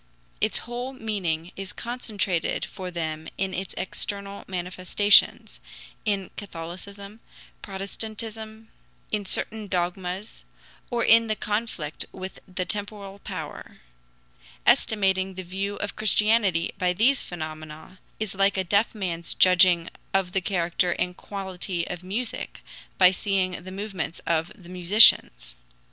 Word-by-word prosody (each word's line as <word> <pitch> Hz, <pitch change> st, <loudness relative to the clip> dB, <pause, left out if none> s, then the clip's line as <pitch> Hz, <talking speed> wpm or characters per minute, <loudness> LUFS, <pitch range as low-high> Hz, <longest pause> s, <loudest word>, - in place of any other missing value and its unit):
Its -, -, +3 dB
whole 245 Hz, +2 st, -4 dB
meaning 185 Hz, -8 st, -2 dB
is 195 Hz, 0 st, -6 dB
concentrated 210 Hz, -8 st, -1 dB
for 185 Hz, -1 st, -7 dB
them 160 Hz, -2 st, -4 dB
in 190 Hz, -1 st, -1 dB
its 190 Hz, 0 st, -4 dB
external 200 Hz, +1 st, -3 dB
manifestations 185 Hz, +2 st, +3 dB, 0.5 s
in 200 Hz, -3 st, 0 dB
Catholicism, 200 Hz, +3 st, -8 dB, 0.4 s
Protestantism, 220 Hz, +2 st, -5 dB, 0.4 s
in 205 Hz, -2 st, -1 dB
certain 215 Hz, +2 st, -2 dB
dogmas, 180 Hz, +2 st, -3 dB, 0.5 s
or 235 Hz, -2 st, 0 dB
in 230 Hz, 0 st, +6 dB
the 215 Hz, -, 0 dB
conflict 210 Hz, -9 st, -3 dB
with 190 Hz, 0 st, -7 dB
the 185 Hz, -1 st, -3 dB
temporal 200 Hz, 0 st, -4 dB
power. -, -, -7 dB, 0.9 s
Estimating 195 Hz, -6 st, +3 dB
the 185 Hz, -, -5 dB
value 195 Hz, +3 st, -3 dB
of 205 Hz, -, -4 dB
Christianity 210 Hz, -4 st, +3 dB
by 180 Hz, -1 st, +2 dB
these 245 Hz, +9 st, +3 dB
phenomena 155 Hz, +1 st, -8 dB, 0.2 s
is 215 Hz, -2 st, -2 dB
like 195 Hz, +1 st, +2 dB
a 190 Hz, -, +2 dB
deaf 200 Hz, +5 st, +2 dB
man's 170 Hz, -4 st, -3 dB
judging 180 Hz, -2 st, +6 dB, 0.3 s
of 190 Hz, -2 st, +2 dB
the 190 Hz, -, 0 dB
character 175 Hz, -1 st, +1 dB
and 180 Hz, 0 st, -2 dB
quality 190 Hz, -3 st, -4 dB
of 180 Hz, -1 st, -5 dB
music 215 Hz, +6 st, -4 dB, 0.4 s
by 185 Hz, -1 st, +8 dB
seeing 190 Hz, -1 st, 0 dB
the 185 Hz, -, -8 dB
movements 195 Hz, -3 st, -4 dB
of 165 Hz, 0 st, +1 dB
the 180 Hz, -, -15 dB
musicians. 175 Hz, -, +6 dB
190 Hz, 125 wpm, -26 LUFS, 180-210 Hz, 0.9 s, by